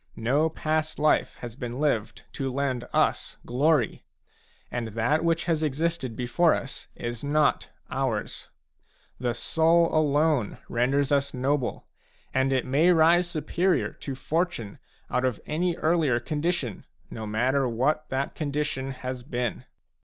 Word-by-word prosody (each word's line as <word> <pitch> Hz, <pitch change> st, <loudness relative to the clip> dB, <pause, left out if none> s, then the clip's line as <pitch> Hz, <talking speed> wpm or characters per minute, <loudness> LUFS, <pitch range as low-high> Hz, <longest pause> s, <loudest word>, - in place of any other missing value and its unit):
No 140 Hz, +8 st, +2 dB
past 155 Hz, 0 st, -1 dB
life 155 Hz, +1 st, +2 dB
has 120 Hz, -2 st, -7 dB
been 125 Hz, 0 st, -5 dB
lived 130 Hz, -8 st, 0 dB
to 135 Hz, -1 st, -2 dB
lend 130 Hz, -2 st, -1 dB
us -, -, +1 dB
glory, 135 Hz, -1 st, +1 dB, 0.7 s
and 120 Hz, -2 st, -2 dB
that 125 Hz, +9 st, +1 dB
which 165 Hz, 0 st, +1 dB
has 165 Hz, -3 st, +1 dB
existed 155 Hz, -4 st, -1 dB
before 130 Hz, +8 st, +3 dB
us 135 Hz, -, -6 dB
is 120 Hz, +1 st, -5 dB
not 150 Hz, +1 st, +2 dB, 0.2 s
ours; 130 Hz, -5 st, -2 dB, 0.7 s
the 120 Hz, -1 st, -1 dB
soul 165 Hz, +6 st, +3 dB
alone 150 Hz, -5 st, +2 dB
renders 135 Hz, +4 st, +1 dB
us 140 Hz, -1 st, +1 dB
noble, 130 Hz, 0 st, -1 dB, 0.5 s
and 130 Hz, +1 st, +2 dB
it 130 Hz, -2 st, +1 dB
may 150 Hz, +7 st, +4 dB
rise 170 Hz, +1 st, +5 dB
superior 175 Hz, +3 st, 0 dB
to 135 Hz, -, -6 dB
Fortune 155 Hz, -, -2 dB, 0.3 s
out 125 Hz, -, +1 dB
of 125 Hz, -4 st, 0 dB
any 170 Hz, +3 st, 0 dB
earlier 155 Hz, -7 st, +2 dB
condition, 150 Hz, -, -2 dB, 0.3 s
no 110 Hz, -1 st, -5 dB
matter 125 Hz, +5 st, +1 dB
what 150 Hz, +6 st, 0 dB
that 135 Hz, +1 st, -2 dB
condition 145 Hz, -3 st, -2 dB
has 130 Hz, -1 st, -5 dB
been. 120 Hz, -2 st, -3 dB
140 Hz, 135 wpm, -27 LUFS, 125-155 Hz, 0.7 s, rise